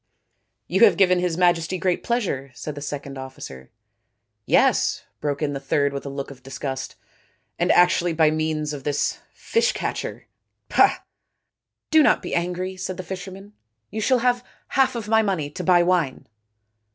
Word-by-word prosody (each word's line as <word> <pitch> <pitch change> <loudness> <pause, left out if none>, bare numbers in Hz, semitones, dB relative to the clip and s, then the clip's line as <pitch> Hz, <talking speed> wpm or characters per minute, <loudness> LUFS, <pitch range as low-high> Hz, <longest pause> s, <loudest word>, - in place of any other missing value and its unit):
" 110 +3 -52
You 190 - +3
have 190 -6 +3
given 180 -2 +4
His 175 -2 -1
Majesty 175 0 +2
great 180 0 0
pleasure," 190 - -2
said 150 - -6
the 145 - -8
second 140 -1 -6
officer. 70 - -9 0.4
" - - -53
Yes," - - +2 0.2
broke 145 0 -2
in 145 -1 0
the 140 - -3
third 140 +1 0
with 140 0 -5
a - - -3
look 140 0 -5
of 130 -2 -13
disgust, 135 0 -5 0.3
" - - -42
and - - +3
actually 175 0 +4
by 160 -1 +3
means 155 -1 -1
of 140 -2 -7
this 145 0 -1
fish 470 +2 0
catcherpah! - - -1 0.2
" - - -55
" - - -62
Do 315 0 +7
not - - +3
be - - -5
angry," 180 +2 -2
said 185 0 -4
the 185 - -5
fisherman. 190 +3 -8 0.2
" 110 -1 -53
You 220 +2 -3
shall 255 +4 +3
have 245 0 +2 0.3
half 265 -1 +2
of 225 -3 -4
my 220 0 +4
money 180 -9 -1
to - - -6
buy 175 -2 +5
wine." 175 -7 0
170 Hz, 185 wpm, -23 LUFS, 140-190 Hz, 0.4 s, Do